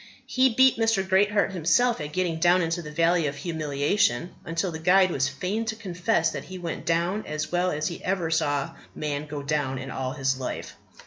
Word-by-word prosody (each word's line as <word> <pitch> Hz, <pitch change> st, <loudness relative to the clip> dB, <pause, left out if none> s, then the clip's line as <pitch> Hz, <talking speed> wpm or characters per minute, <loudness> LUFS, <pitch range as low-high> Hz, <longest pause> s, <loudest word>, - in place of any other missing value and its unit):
He 260 Hz, 0 st, +3 dB
beat 260 Hz, +1 st, +4 dB
Mr. 225 Hz, -4 st, +1 dB
Greatheart 200 Hz, +1 st, +3 dB
himself 190 Hz, +5 st, +2 dB
at 150 Hz, 0 st, -5 dB
getting 170 Hz, -1 st, -1 dB
down 175 Hz, +2 st, +4 dB
into 165 Hz, +1 st, -1 dB
the 150 Hz, -, -8 dB
Valley 165 Hz, +1 st, +2 dB
of 140 Hz, -, -3 dB
Humiliation, 160 Hz, +4 st, 0 dB, 0.2 s
till 175 Hz, +2 st, 0 dB
the 160 Hz, -, -6 dB
guide 185 Hz, +2 st, +4 dB
was 135 Hz, -4 st, +1 dB
fain 185 Hz, +11 st, -2 dB
to 220 Hz, 0 st, -2 dB
confess 180 Hz, -4 st, 0 dB
that -, -, -6 dB
he 185 Hz, -, -8 dB
went 170 Hz, -2 st, -6 dB
down 170 Hz, +5 st, +1 dB
as 155 Hz, 0 st, -3 dB
well 180 Hz, +1 st, +1 dB
as 155 Hz, -2 st, -1 dB
he 170 Hz, -, -6 dB
ever 180 Hz, -3 st, -1 dB
saw 145 Hz, -3 st, 0 dB, 0.2 s
man 150 Hz, 0 st, -3 dB
go 145 Hz, -1 st, -5 dB
down 140 Hz, -2 st, -1 dB
in 130 Hz, 0 st, -6 dB
all 130 Hz, 0 st, -3 dB
his 135 Hz, -2 st, -1 dB
life. 130 Hz, -, -5 dB
170 Hz, 200 wpm, -26 LUFS, 150-190 Hz, 0.2 s, beat